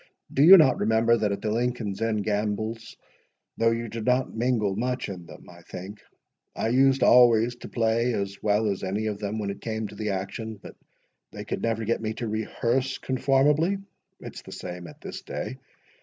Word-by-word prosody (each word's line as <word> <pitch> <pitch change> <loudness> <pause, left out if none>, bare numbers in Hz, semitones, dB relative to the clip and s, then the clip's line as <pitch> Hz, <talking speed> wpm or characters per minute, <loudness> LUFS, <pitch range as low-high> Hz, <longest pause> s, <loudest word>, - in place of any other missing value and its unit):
Do 135 - +2
you 180 +6 +10
not 145 -7 +4
remember, 115 +1 +3
that 105 -3 0
at 100 - -4
the 105 - 0
Lincoln's 115 -3 -2
Inn 110 -2 0
gambols—though 110 +2 -3
you 115 0 -2
did 115 0 -6
not 125 +2 +1
mingle 110 -4 0
much 125 +1 -2
in 90 -3 -8
them, - - -13
I - - -14
think—I 100 +3 -8
used 135 +2 +3
always 120 -1 +5
to - - -10
play 115 +1 +1
as 100 -1 -4
well 105 +1 +2
as 100 -1 -3
any 100 +3 -2
of 105 -2 -3
them 105 +1 -3
when 100 -2 -2
it - - -9
came 110 -1 -3
to - - -11
the 105 0 -3
action, 100 +3 -4
but 100 - -13 0.6
they - - -8
could - - -4
never 115 -1 -1
get 115 +1 0
me 110 -1 -2
to 120 - -4
rehearse 120 +4 -1
conformably. 145 +7 +2 0.4
It's - - -9
the - - -13
same 90 -1 -7
at 75 - -14
this - - -7
day. 65 - -6
110 Hz, 185 wpm, -26 LUFS, 105-120 Hz, 0.6 s, you